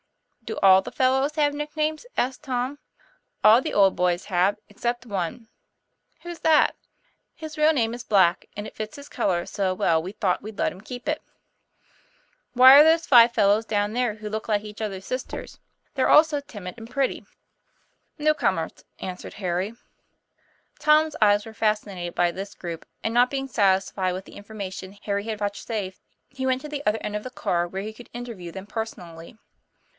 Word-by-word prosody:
"Do 220 Hz, -, -5 dB
all 190 Hz, -1 st, +7 dB
the -, -, -8 dB
fellows 265 Hz, +3 st, +1 dB
have 295 Hz, -2 st, +2 dB
nicknames?" 305 Hz, +4 st, -2 dB
asked 260 Hz, +3 st, -1 dB
Tom.; 260 Hz, +1 st, -2 dB, 0.3 s
' -, -, -40 dB
All 220 Hz, +4 st, +7 dB
the -, -, -4 dB
old 195 Hz, -2 st, +4 dB
boys 180 Hz, 0 st, 0 dB
have, 190 Hz, +2 st, +1 dB
except 240 Hz, +4 st, -3 dB
one." 200 Hz, +1 st, -4 dB, 0.8 s
"Who's 345 Hz, -1 st, -7 dB
that?" 315 Hz, -1 st, +4 dB, 0.3 s
" -, -, -44 dB
His 315 Hz, -1 st, -8 dB
real 305 Hz, +1 st, +5 dB
name 230 Hz, -7 st, 0 dB
is 240 Hz, 0 st, -6 dB
Black, 190 Hz, -4 st, +3 dB
and 205 Hz, -, -4 dB
it -, -, -10 dB
fits 215 Hz, 0 st, -6 dB
his 285 Hz, -, -10 dB
color 175 Hz, -3 st, -1 dB
so 190 Hz, -2 st, -1 dB
well 165 Hz, -3 st, +2 dB
we 180 Hz, +3 st, -6 dB
thought 200 Hz, -3 st, -1 dB
we'd 215 Hz, 0 st, -9 dB
let -, -, +1 dB
him 185 Hz, -, -12 dB
keep 245 Hz, +5 st, -9 dB
it." 305 Hz, +1 st, -1 dB, 1.3 s
'Who 250 Hz, -, +3 dB
are 270 Hz, +3 st, +11 dB
those 320 Hz, +1 st, +4 dB
five 240 Hz, -2 st, +7 dB
fellows 210 Hz, -1 st, +3 dB
down 210 Hz, -1 st, -1 dB
there, 245 Hz, -3 st, 0 dB
who 215 Hz, 0 st, -8 dB
look 220 Hz, +1 st, -5 dB
like 210 Hz, -1 st, +1 dB
each 210 Hz, 0 st, -9 dB
other's 195 Hz, -3 st, -4 dB
sisters, 255 Hz, 0 st, -6 dB, 0.3 s
they're 265 Hz, -, +1 dB
all 300 Hz, -, +8 dB
so 300 Hz, -3 st, -3 dB
timid 205 Hz, -10 st, -9 dB
and 225 Hz, 0 st, -10 dB
pretty?" 270 Hz, +1 st, -1 dB
36 -, -, -28 dB
TOM -, -, -36 dB, 0.8 s
PLAYFAIR. 300 Hz, -, -7 dB
"New 305 Hz, -, +6 dB
comers," 305 Hz, -, -2 dB
answered 180 Hz, -1 st, -7 dB
Harry. 185 Hz, +2 st, -2 dB, 1.1 s
Tom's 305 Hz, +1 st, +4 dB
eyes 205 Hz, 0 st, +4 dB
were 225 Hz, -, -10 dB
fascinated 210 Hz, -5 st, -2 dB
by 175 Hz, -1 st, +2 dB
this 195 Hz, +3 st, -7 dB
group; 170 Hz, -2 st, -7 dB, 0.2 s
and, 225 Hz, -, -1 dB
not 245 Hz, +1 st, +4 dB
being 270 Hz, -1 st, -3 dB
satisfied 190 Hz, -4 st, +1 dB
with 185 Hz, +1 st, -6 dB
the -, -, -14 dB
information 200 Hz, -2 st, -8 dB
Harry 200 Hz, 0 st, -2 dB
had 220 Hz, -1 st, -3 dB
vouchsafed, 205 Hz, -1 st, -4 dB, 0.3 s
he 260 Hz, 0 st, -4 dB
went 260 Hz, 0 st, +1 dB
to 300 Hz, -, -8 dB
the 295 Hz, -1 st, -5 dB
other 210 Hz, +1 st, +2 dB
end 210 Hz, -, -4 dB
of 210 Hz, -, -3 dB
the 255 Hz, -, -6 dB
car 175 Hz, -8 st, -1 dB
where 190 Hz, +2 st, -5 dB
he 215 Hz, +1 st, -6 dB
could 235 Hz, +2 st, -14 dB
interview 230 Hz, -8 st, -7 dB
them 190 Hz, +2 st, -8 dB
personally. 175 Hz, -6 st, -7 dB
220 Hz, 190 wpm, -25 LUFS, 195-260 Hz, 1.3 s, are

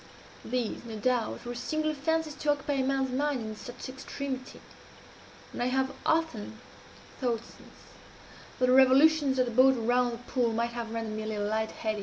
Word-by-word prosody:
These, 245 Hz, -2 st, -2 dB
no 230 Hz, -2 st, -7 dB
doubt, 245 Hz, +1 st, 0 dB
were 240 Hz, -, -4 dB
singular 310 Hz, +5 st, -1 dB
fancies 315 Hz, +2 st, -1 dB
to 295 Hz, -, -3 dB
occupy 290 Hz, 0 st, -1 dB
a 270 Hz, -1 st, +1 dB
man's 265 Hz, -1 st, 0 dB
mind 280 Hz, 0 st, 0 dB
in 220 Hz, -1 st, -5 dB
such 245 Hz, +5 st, -8 dB
extremity 265 Hz, 0 st, -6 dB, 0.9 s
and -, -, -4 dB
I 245 Hz, -, +2 dB
have 265 Hz, +1 st, +1 dB, 0.2 s
often 250 Hz, -10 st, 0 dB, 0.6 s
thought, 235 Hz, -3 st, 0 dB
since, -, -, -17 dB, 0.7 s
that 255 Hz, -, +3 dB
the 250 Hz, -, +3 dB
revolutions 270 Hz, +2 st, +5 dB
of 255 Hz, -, +3 dB
the 240 Hz, -, -4 dB
boat 260 Hz, +2 st, +5 dB
around 245 Hz, +1 st, +2 dB
the -, -, -5 dB
pool 245 Hz, -1 st, -1 dB
might 235 Hz, +1 st, 0 dB
have 235 Hz, -1 st, -4 dB
rendered 225 Hz, -1 st, -3 dB
me -, -, -3 dB
a 215 Hz, -, -5 dB
little 210 Hz, -1 st, -2 dB
light 220 Hz, +1 st, 0 dB
headed. 215 Hz, -1 st, -3 dB
255 Hz, 185 wpm, -29 LUFS, 230-275 Hz, 0.9 s, revolutions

